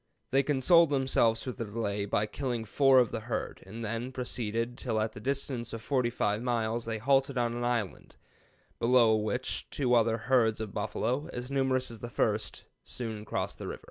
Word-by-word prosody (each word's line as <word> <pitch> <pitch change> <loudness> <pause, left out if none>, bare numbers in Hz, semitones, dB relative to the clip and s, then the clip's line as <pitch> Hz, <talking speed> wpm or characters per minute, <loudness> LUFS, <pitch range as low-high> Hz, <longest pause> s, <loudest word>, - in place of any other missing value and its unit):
They 135 - +4
consoled 150 +4 +4
themselves 130 -5 +2
for 130 - -3
the 115 - -5
delay 105 -2 -2
by 105 +1 +1
killing 120 -1 -3
four 135 +4 +4
of 125 -2 +4
the - - -2
herd, 115 +1 -4
and 115 +4 -6
then 115 +4 -3
proceeded 120 -2 -2
till 115 -4 -2
at 110 0 0
the - - -10
distance 130 -1 -2
of 115 - -5
45 120 -5 0
miles 115 -1 -1
they 115 -1 -2
halted 135 +3 +2
on 120 -1 +1
an 120 0 -3
island, 120 -6 -2 0.6
below 115 -2 +5
which 110 +4 -2
two 125 -4 0
other 115 -1 +4
herds 115 -2 +2
of 110 -3 -5
buffalo, 120 +7 -2
as 125 +2 -6
numerous 130 -2 +1
as 115 - -9
the 120 - -6
first, - - -1 0.2
soon 115 -3 -5
after 105 - -10
crossed - - -3
the - - -5
river." - - -5
120 Hz, 190 wpm, -30 LUFS, 110-130 Hz, 0.6 s, below